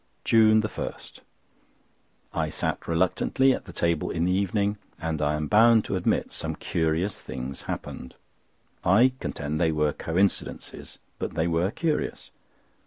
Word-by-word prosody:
JUNE 110 -1 +5
1.—I 105 - -8
sat - - -3
reluctantly 95 +10 +2
at - - -5
the 95 - -9
table 85 -2 0
in 85 0 0
the 90 - +2
evening, 100 +2 0 0.2
and 80 -2 -2
I 75 0 +1
am 75 0 -2
bound 110 +6 +5
to - - -2
admit 90 - 0
some - - -4
curious 80 +4 -1
things 65 +1 -6
happened. 65 - -6 0.7
I 110 +9 +5
contend 75 +1 -3
they 80 -2 +3
were 75 -1 +1
coincidences, 95 +4 -2 0.2
but - - -4
they 80 0 +1
were 85 +2 +1
curious. 155 +7 -2
85 Hz, 135 wpm, -26 LUFS, 80-105 Hz, 0.7 s, JUNE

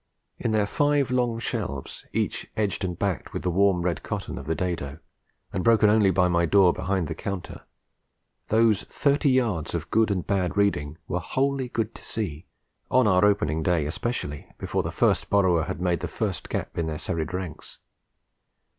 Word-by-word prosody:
In - - -1
their 105 -1 +2
five 145 +3 +1
long 120 -2 +1
shelves, 115 - -4
each - - -2
edged 105 -3 0
and 90 -2 -2
backed 95 -6 -2
with - - -4
the 90 - +1
warm 95 -1 +3
red 85 -3 -1
cotton - - -4
of 70 - -10
the 80 - 0
dado, 80 -5 -3 0.6
and 95 -2 -1
broken 110 -2 +5
only 105 -2 +4
by 90 0 +3
my 85 -1 +2
door 95 -1 +5
behind 95 -3 -1
the 80 - -3
counter, 95 +2 -6 0.8
those 110 -2 +3
thirty 145 +1 +1
yards 115 - +1
of - - -4
good 110 0 +3
and 95 -4 -1
bad 95 -1 0
reading 80 -7 +1
were - - -1
wholly 135 -1 -1
good 115 -1 -2
to - - -12
see, 95 -7 -4 0.4
on 130 -1 +4
our 95 -1 +4
opening 80 -7 +2
day 80 -2 +1
especially, 75 - -3
before - - -1
the - - -4
first - - +1
borrower 90 -5 +3
had - - -4
made 90 -2 +1
the - - -3
first - - -3
gap - - -3
in 80 - 0
their 80 -1 -3
serried 85 0 -3
ranks. 90 -4 -6
95 Hz, 180 wpm, -26 LUFS, 85-110 Hz, 0.8 s, broken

